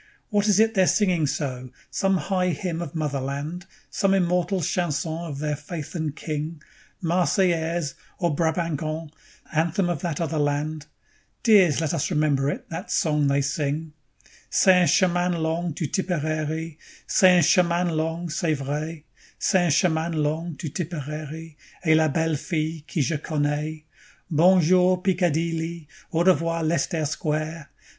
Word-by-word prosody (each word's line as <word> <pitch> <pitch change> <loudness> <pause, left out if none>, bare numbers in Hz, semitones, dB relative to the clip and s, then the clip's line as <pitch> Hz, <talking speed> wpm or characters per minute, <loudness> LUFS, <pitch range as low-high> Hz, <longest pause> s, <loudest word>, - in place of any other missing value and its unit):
What 205 -2 +1
is 205 -1 +4
it 225 0 +4
they're 190 -3 +3
singing 180 -7 +2
so? 130 -3 -3 0.2
Some 195 -1 +1
high 180 +2 0
hymn 170 0 -2
of 170 -2 -6
Motherland? 145 +4 -3 0.2
Some 195 0 +2
immortal 180 0 +1
chanson 155 -1 -1 0.2
of 140 - -5
their 150 +1 -1
Faith 155 +1 -7
and 155 -4 -3
King? 155 +1 -4 0.4
'Marseillaise' 170 -3 +1 0.2
or 170 -4 0
'Brabanc, 165 -1 0
on', 155 0 -4 0.4
anthem 170 +4 +1
of 170 -5 -2
that 165 -5 -2
other 160 -2 -1
land, 145 +1 -1 0.6
Dears, 190 - +5
let 160 -1 -1
us 165 - -1
remember 150 -4 +1
it, - - -5
that 165 - -5
song 150 -3 +2
they 140 0 +2
sing: 150 +3 -2 0.6
_"C'est 190 - +5
un 175 - +4
chemin 180 -1 +3
long 165 +2 -1
'to 160 - -2
Tepararee', 155 -2 -2 0.3
C'est 185 -3 +5
un 175 - +4
chemin 175 +2 +3
long, 165 +2 -2
c'est 165 -1 0
vrai; 150 +3 -4 0.3
C'est 185 -3 +2
un - - +2
chemin 160 +1 +2
long 155 +2 -1
'to 165 - -5
Tepararee', 155 -1 -6 0.3
Et 160 - +5
la 160 0 +4
belle 160 +1 0
fille 155 +1 -3
qu'je 150 +1 -1
connais. 150 +1 -2 0.5
Bonjour, 180 +2 +4
Peekadeely! 170 -2 0 0.3
Au 165 - +1
revoir, 165 -2 +2
Lestaire 160 0 0
Squaire! 155 +1 -3
160 Hz, 145 wpm, -24 LUFS, 150-175 Hz, 0.6 s, Dears